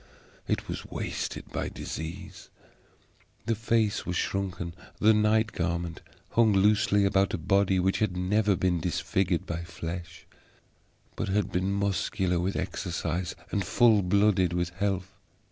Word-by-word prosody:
It - - -1
was - - -4
wasted - - -4
by - - -2
disease; 90 +4 -7 1.0
the 115 - +1
face 110 -1 +1
was 90 - -3
shrunken; 90 -3 -2 0.3
the 110 +1 +6
night 110 +1 +3
garment 85 -2 -2 0.3
hung 115 -2 +4
loosely 100 +1 +4
about 95 0 +2
a - - -3
body 95 +2 +2
which 95 +1 +1
had 100 -4 0
never 100 +2 +2
been 90 -1 +1
disfigured 90 +1 0
by 85 0 -4
flesh, 85 0 -7 0.9
but - - -2
had 105 +1 0
been 95 +2 0
muscular 100 -2 0
with 95 +3 -1
exercise 85 -1 -3 0.2
and 100 - 0
full 110 +3 +4
blooded 95 -1 +3
with 90 0 0
health. 95 0 -2
95 Hz, 135 wpm, -28 LUFS, 90-105 Hz, 1.0 s, the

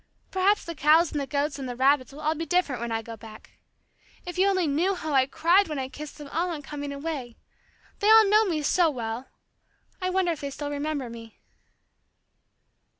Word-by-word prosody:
Perhaps 385 +2 +2
the 335 - -5
cows 315 +2 +4
and 295 - -2
the 275 - -4
goats 285 0 -1
and 260 -2 -5
the 245 - -5
rabbits 265 +1 +2
will 290 +2 -11
all 310 +1 +1
be 320 +1 -4
different 330 -8 0
when 235 -1 -3
I 225 0 -2
go 230 0 -8
back. 220 -1 -14 0.7
If 355 +1 -6
you 385 - +5
only 375 -3 +2
knew 330 +7 +1
how 315 -4 -4
I 260 -1 +4
cried 350 +8 +3
when 305 -2 -4
I 260 -1 -3
kissed 295 +2 -9
them 295 - -9
all 340 +5 -1
on 310 -4 -5
coming 285 0 -6
away. 280 -5 -5 0.6
They 415 - +2
all 440 0 +8
know 425 +2 +5
me 320 -6 -1
so 340 +3 +3
well. 235 -2 -5 0.7
I 370 - 0
wonder 370 -1 +1
if 315 - -5
they 280 - -3
still 290 +1 -5
remember 290 -2 -3
me." 230 -1 -11
295 Hz, 210 wpm, -26 LUFS, 270-350 Hz, 0.7 s, all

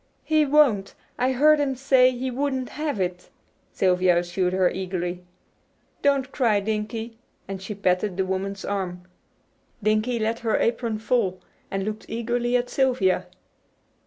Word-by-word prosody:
"He 310 -1 +2
won't! 265 -10 +3 0.2
I 255 +1 +2
heard 300 +4 +5
him 275 -2 0
say 260 -1 +4
he 255 +1 -3
wouldn't 265 0 -2
have 300 -7 -3
it," 180 -1 -3 0.4
Sylvia 180 -1 +3
assured 175 +1 0
her 185 -1 +3
eagerly. 180 -1 -3 0.8
"Don't 275 -2 +2
cry, 225 -6 +2
Dinkie," 220 +2 -4 0.3
and 195 -1 -6
she 205 +2 -6
patted 185 0 0
the 190 - +1
woman's 190 +1 -3
arm. 180 -3 -3 0.8
Dinkie 215 +3 +1
let 225 +1 -1
her 225 -2 +1
apron 230 -1 0
fall 220 -5 0 0.3
and 195 0 -2
looked 215 +1 -5
eagerly 240 +1 0
at 245 0 -2
Sylvia. 245 -9 +1
220 Hz, 140 wpm, -24 LUFS, 190-255 Hz, 0.8 s, heard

